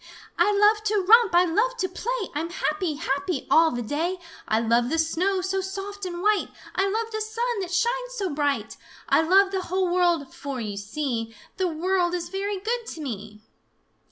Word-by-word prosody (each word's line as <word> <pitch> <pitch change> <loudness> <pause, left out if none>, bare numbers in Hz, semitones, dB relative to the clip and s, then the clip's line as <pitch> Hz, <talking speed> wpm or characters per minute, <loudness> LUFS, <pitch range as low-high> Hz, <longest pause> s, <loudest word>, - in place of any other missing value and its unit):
"I 350 +5 +3
love 415 +1 +4
to 425 -1 +2
romp! 455 -4 +6
I 355 +1 +6
love 450 +9 +1
to 380 -5 0
play! 435 +3 -3
I'm 315 +3 -2
happy, 350 -2 -1
happy, 325 +4 -2
all 325 0 +6
the 240 -3 -3
day! 325 +10 -1 0.3
I 220 - +2
love 235 +1 +2
the 325 - 0
snow, 360 +4 +1
so 380 +1 -1
soft 390 +1 -6
and 350 0 -5
white! 420 -1 +3 0.3
I 385 +2 +1
love 450 +2 -2
the 435 0 -3
sun 460 +2 -2
that 375 -3 -3
shines - - 0
so 390 -7 -2
bright! 285 -1 -1 0.3
I - - +5
love 385 +4 +4
the 380 -1 -1
whole 365 0 -1
world, 345 -6 +1
for, 275 -2 -5
you 210 -3 -4
see, 225 +1 -3 0.2
The 375 - +1
world 350 +2 0
is 345 -1 -4
very 395 +2 -2
good 460 +4 -3
to 325 - -7
me!" 215 -5 -6
365 Hz, 190 wpm, -25 LUFS, 310-405 Hz, 0.3 s, romp